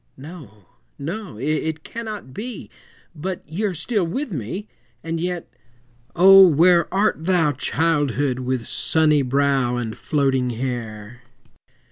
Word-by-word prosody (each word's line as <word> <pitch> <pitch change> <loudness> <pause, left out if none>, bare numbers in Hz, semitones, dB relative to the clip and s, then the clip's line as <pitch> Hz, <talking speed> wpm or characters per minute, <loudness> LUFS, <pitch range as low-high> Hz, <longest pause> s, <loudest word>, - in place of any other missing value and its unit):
No, 130 - -12 0.3
no, 170 - -6
it 155 +4 -2
cannot 215 - -7
be, 240 - -7 0.4
But 180 +3 -6
ye 175 +8 -3
are 195 -3 -2
still 195 +6 -1
with 245 - -3
me! 165 - -5 0.4
And 165 0 -3
yet, 175 0 -3 0.7
O! 195 +1 +8
where 170 +1 +4
art 195 -4 +1
thou, 170 -5 +2
Childhood, 145 -3 0
with 130 -2 -2
sunny 155 -2 +3
brow 135 -1 +1
And 115 -3 -4
floating 135 -4 0
hair? 120 -2 -5
155 Hz, 120 wpm, -21 LUFS, 130-180 Hz, 0.7 s, O